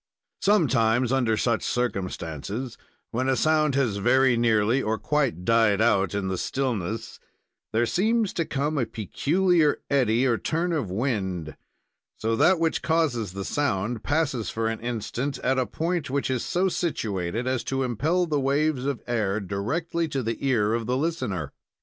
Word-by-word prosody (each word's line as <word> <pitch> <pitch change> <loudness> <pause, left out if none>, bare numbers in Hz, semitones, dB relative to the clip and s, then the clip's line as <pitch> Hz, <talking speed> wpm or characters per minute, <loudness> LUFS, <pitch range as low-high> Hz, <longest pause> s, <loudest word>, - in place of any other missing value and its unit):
Sometimes, 130 - +3
under 120 -5 +2
such 115 0 +1
circumstances, 100 - -3 0.4
when 130 +3 0
a 130 - +3
sound 155 +1 +2
has 120 -7 +1
very 130 +4 +4
nearly 115 +2 +2
or 110 -1 -1
quite 135 - -1
died 115 -2 +3
out 100 -5 +2
In 100 -2 -1
the 95 -1 -2
stillness, 115 -6 -3 0.5
there 115 +2 +2
seems 215 - +1
to 165 - 0
come 145 0 -1
a 120 - 0
peculiar 155 - +1
eddy 125 -3 +3
or 120 -3 +2
turn 170 +2 -1
of 140 - -1
wind, 95 - -2 0.7
or 115 +1 +1
that 185 +10 +4
which 165 -1 0
causes 140 - 0
the 100 0 -5
sound, 115 -5 -1
passes 145 -7 0
for 115 0 -1
an 115 - -3
instant 120 +4 -3
at 130 +1 +2
a 130 - 0
point 165 -3 -2
which 135 0 -1
is 125 -3 -1
so 185 +2 +1
situated 110 - -2
as 130 -2 -1
to 135 0 -1
impel 150 - +1
the 150 -3 0
waves 140 0 +1
of 140 -4 -3
air 110 -4 0
directly 140 - -2
to 135 -3 -2
the 115 +3 -3
ear 115 -6 +2
of 115 -1 -2
the 125 +1 +1
listener. 130 - -2
125 Hz, 160 wpm, -25 LUFS, 110-145 Hz, 0.7 s, very